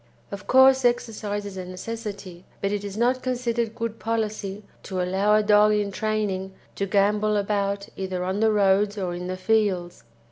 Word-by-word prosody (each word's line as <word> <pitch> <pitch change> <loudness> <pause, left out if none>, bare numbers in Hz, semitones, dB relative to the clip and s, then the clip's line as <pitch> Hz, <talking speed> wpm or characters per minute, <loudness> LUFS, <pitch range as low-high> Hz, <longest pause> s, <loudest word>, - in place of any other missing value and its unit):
Of 200 -1 -8
course 265 0 +6
exercise 215 -4 -1
is 200 -2 -7
a 185 - -5
necessity, 195 -1 -7 0.2
but 200 - -1
it 205 -1 -2
is 200 0 -6
not 250 +2 +2
considered 235 -3 -1
good 230 -1 -4
policy 215 -3 -3 0.2
to 190 -2 -5
allow 190 +4 +2
a 215 - +3
dog 210 0 +5
in 205 -1 0
training 195 -2 -2 0.2
to 200 - -1
gambol 210 +2 +2
about 200 -1 -1
either 185 -1 -3
on 190 +2 -2
the 220 0 +3
roads 205 0 +2
or 185 -3 -2
in 180 +1 -5
the 185 0 -4
fields. 185 - 0
205 Hz, 175 wpm, -25 LUFS, 190-220 Hz, 0.2 s, course